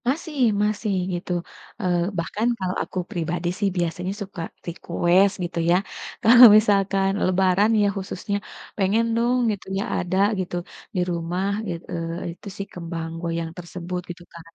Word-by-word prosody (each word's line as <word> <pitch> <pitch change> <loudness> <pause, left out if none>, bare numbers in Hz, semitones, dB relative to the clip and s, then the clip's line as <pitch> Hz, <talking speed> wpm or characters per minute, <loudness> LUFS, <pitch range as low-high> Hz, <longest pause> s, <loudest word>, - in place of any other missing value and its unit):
Masih 300 +2 -3 0.3
masih, 210 0 0 0.2
gitu. 175 +1 -4 0.5
Eee, 180 -3 +1 0.2
bahkan 205 +7 -1
kalau 185 -1 -1
aku - - -9
pribadi 175 -2 -2
sih 205 - +2
biasanya 175 +2 -1
suka 190 -3 -6 0.2
request, 175 +3 +2
gitu 175 -1 -3
ya. 175 - +5 0.5
Kalau 240 +3 +10
misalkan 195 -2 +2 0.2
lebaran 185 +3 +3
ya, 205 - +4
khususnya 195 +1 -4 0.4
pengen, 205 +3 +2
dong, 240 +2 +2 0.2
gitu 200 - -9
ya, 195 - 0 0.2
ada 180 +1 -2 0.2
gitu, 180 -1 -3 0.4
di - - +1
rumah 170 +2 -2 0.2
it 170 -1 -3
eee, 170 +1 -4
itu 180 - -14
sih, 200 - -4
kembang 165 -1 -5
goyang 165 -1 -2
tersebut, 180 +1 -5
gitu 175 0 -8
kan. 170 - -10
185 Hz, 150 wpm, -23 LUFS, 170-200 Hz, 0.5 s, Kalau